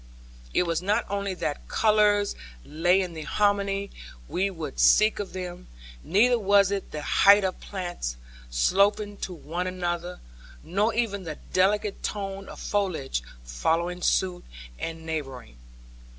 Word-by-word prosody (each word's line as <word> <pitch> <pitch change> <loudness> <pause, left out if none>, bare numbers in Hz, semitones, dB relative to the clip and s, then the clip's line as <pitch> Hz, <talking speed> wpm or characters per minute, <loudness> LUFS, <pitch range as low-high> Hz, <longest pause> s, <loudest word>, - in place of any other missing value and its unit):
It - - +2
was 170 -1 -1
not 200 +3 +1
only 200 -1 -2
that 150 -4 -4
colours 210 -2 +3 0.3
lay 175 +5 +2
in 180 -2 -4
the 160 - -6
harmony 200 +2 0 0.4
we 195 - 0
would 160 -7 -7
seek 215 0 +5
of 205 - -4
them, 180 -1 -6 0.4
neither 235 +6 +3
was 200 -1 +4
it 200 -1 -3
the 150 -1 -6
height 200 +5 +6
of 190 -1 -2
plants, 175 - -5 0.3
sloping 200 - +2
to 190 - -5
one 170 +3 -4
another; 175 -1 -3 0.4
nor 200 +7 +1
even 220 -4 0
the 160 -4 -6 0.2
delicate 200 +2 +2
tone 195 -1 -4
of - - -10
foliage 180 - -1 0.2
following 165 - -1
suit, 180 0 +1 0.4
and 165 0 -5
neighbouring. 135 - -5
185 Hz, 135 wpm, -26 LUFS, 165-200 Hz, 0.4 s, height